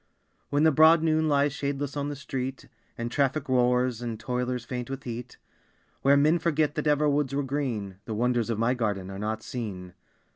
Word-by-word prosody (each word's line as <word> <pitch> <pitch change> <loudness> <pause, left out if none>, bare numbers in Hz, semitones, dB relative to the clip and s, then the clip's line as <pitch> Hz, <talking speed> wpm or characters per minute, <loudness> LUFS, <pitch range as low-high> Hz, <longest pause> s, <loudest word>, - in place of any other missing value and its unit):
When 145 +1 +2
the 160 - +6
broad 160 +2 +6
noon 160 -1 +2
lies 145 -1 +2
shadeless 140 0 -3
on 145 0 -2
the 145 - -4
street, 135 -1 -5 0.3
And 115 0 -3
traffic 140 +2 0
roars, 125 -1 +2
and 115 -3 -4
toilers 125 0 -2
faint 125 0 -5
with 135 0 -5
heat, 120 +1 -7 0.6
Where 140 +1 +5
men 155 +4 +4
forget 155 -3 +1
that 155 -1 -2
ever 150 0 +3
woods 140 -2 +1
were 145 - 0
green, 125 -9 -3
The 110 - -4
wonders 120 0 +1
of 115 - -1
my 115 +3 +2
garden 100 -6 -2
are 95 - -7
not 110 +1 -3
seen. 95 -7 -6
130 Hz, 190 wpm, -27 LUFS, 120-145 Hz, 0.6 s, the